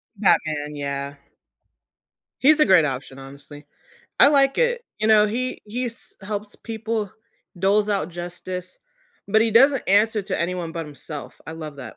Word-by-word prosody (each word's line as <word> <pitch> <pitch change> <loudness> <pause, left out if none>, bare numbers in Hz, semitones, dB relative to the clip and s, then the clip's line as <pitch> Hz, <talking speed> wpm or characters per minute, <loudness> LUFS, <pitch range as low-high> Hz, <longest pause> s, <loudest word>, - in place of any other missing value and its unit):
Batman, 155 -7 +1
yeah. 140 0 -4 1.3
He's 300 +3 +5
a - - +7
great 185 -6 +5
option, 135 -1 -5
honestly. 140 +2 -12 0.5
I - - +8
like 275 -1 +3
it. 485 0 +1 0.2
You 215 - 0
know, 215 -1 +6
he 250 +4 -3
he's 235 +2 -6
helps 205 +1 -6
people, 220 -2 -4 0.5
doles 200 +3 +2
out 195 -6 0
justice, 175 +1 -7 0.5
but 220 +2 +4
he 225 0 +2
doesn't 270 +4 +5
answer 210 +2 +3
to 195 - -4
anyone 170 -1 -3
but 165 -1 -4
himself. 150 0 -9
I 160 - -6
love 155 -3 -8
that. 135 - -10
195 Hz, 150 wpm, -23 LUFS, 155-225 Hz, 1.3 s, I